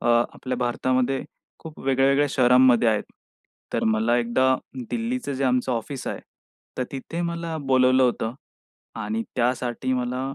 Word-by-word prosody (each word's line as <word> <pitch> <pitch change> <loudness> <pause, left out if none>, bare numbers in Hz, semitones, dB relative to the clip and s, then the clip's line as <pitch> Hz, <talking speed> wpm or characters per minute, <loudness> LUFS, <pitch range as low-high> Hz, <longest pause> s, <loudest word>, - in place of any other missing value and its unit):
अ, - - -3
आपल्या 120 +2 +1
भारतामध्ये 130 +2 0 0.4
खूप 160 -1 -11
वेगळ्या-वेगळ्या 135 +2 +3
शहरांमध्ये 125 -2 +5
आहेत. 110 -2 +1 0.7
तर - - 0
मला 110 +2 +2
एकदा 130 +2 +2 0.4
दिल्लीचं 235 - -2
जे 135 +1 -1
आमचं 125 0 +1
ऑफिस 125 +3 -4
आहे, - - -3 0.6
तर - - +1
तिथे 150 +5 -5
मला 170 -1 -4
बोलावलं 130 -2 +3
होतं. 120 -2 0 0.6
आणि 110 0 -3
त्यासाठी 125 +1 0
मला 125 0 -1
130 Hz, 135 wpm, -24 LUFS, 120-135 Hz, 0.7 s, शहरांमध्ये